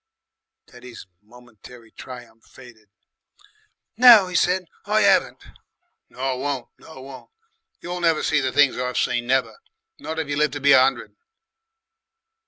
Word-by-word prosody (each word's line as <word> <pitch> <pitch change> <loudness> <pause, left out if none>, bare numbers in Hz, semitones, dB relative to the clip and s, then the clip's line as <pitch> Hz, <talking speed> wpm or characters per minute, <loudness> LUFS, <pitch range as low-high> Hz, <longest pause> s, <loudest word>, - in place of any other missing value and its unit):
Teddy's 125 -1 -14 0.2
momentary 115 0 -18
triumph 120 -3 -13
faded. 115 -5 -18 1.1
"No," 230 -6 +7
he 180 - -8
said, 180 +2 0 0.2
"I 215 +1 +1
'aven't." 200 -1 +1 0.7
"Nor 130 0 -4
won't. 135 -3 -5
Nor 155 -5 -14
won't. 135 -1 -13 0.5
You'll 180 0 -6
never 165 -2 +1
see 155 - +1
the 130 -1 -2
things 140 -3 +2
I've 125 0 -4
seen, 120 -1 -2
never. 130 0 -1 0.4
Not 160 - -7
if 160 -2 -3
you 145 0 -4
live 150 0 +1
to 145 - -5
be 140 0 +2
a 135 - +6
'undred... 130 -3 -3
135 Hz, 140 wpm, -21 LUFS, 125-160 Hz, 1.1 s, No